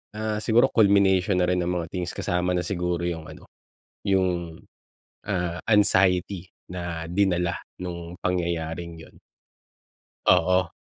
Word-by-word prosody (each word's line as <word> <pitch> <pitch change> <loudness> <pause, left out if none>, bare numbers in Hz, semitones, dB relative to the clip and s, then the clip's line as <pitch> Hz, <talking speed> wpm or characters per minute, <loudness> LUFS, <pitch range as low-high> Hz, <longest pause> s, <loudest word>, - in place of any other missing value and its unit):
ah, 110 0 -2
siguro 120 +3 +4
culmination 100 -3 +4
na 90 - +2
rin 90 0 +1
ng 90 - -1
mga 85 -2 -2
things 90 -2 -3
kasama 90 +1 -1
na 90 - +1
siguro 90 -1 -2
yung 80 -2 -4
ano, - - -12 0.6
yung, 90 -4 0 0.7
ah, 90 -3 -2
anxiety 95 -3 +3 0.2
na 85 -2 -4
dinala 90 -2 +1 0.2
nung 85 -1 -6
pangyayaring 85 -1 -2
'yon. - - -14 1.2
Oo. 90 0 +3
90 Hz, 120 wpm, -25 LUFS, 85-95 Hz, 1.2 s, siguro